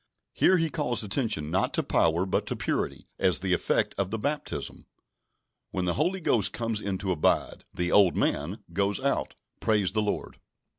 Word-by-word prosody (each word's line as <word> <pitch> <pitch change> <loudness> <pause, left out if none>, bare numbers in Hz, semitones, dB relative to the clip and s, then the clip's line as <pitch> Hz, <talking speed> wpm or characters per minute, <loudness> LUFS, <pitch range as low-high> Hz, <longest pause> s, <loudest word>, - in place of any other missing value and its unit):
Here 185 - +4
he 165 -2 0
calls 130 -8 0
attention 100 - -1
not 95 - +1
to - - +1
power, 85 +3 +2
but 95 - -1
to - - -1
purity, - - -2
as 95 -1 +3
the 95 -1 0
effect - - +1
of 95 -1 0
the 110 - -2
baptism. 145 +7 -4 0.8
When 95 -1 -2
the 90 - +1
Holy 175 +6 0
Ghost 115 - +1
comes 115 -2 -2
in 100 -2 -2
to 95 0 -2
abide, 80 -4 +1
"the 90 0 -2
old 100 -3 +5
man" 85 +9 -1
goes 100 +1 +1
out. - - -1 0.2
Praise 105 -4 +2
the 110 +2 +1
Lord! 105 -1 -3
100 Hz, 180 wpm, -27 LUFS, 90-115 Hz, 0.8 s, old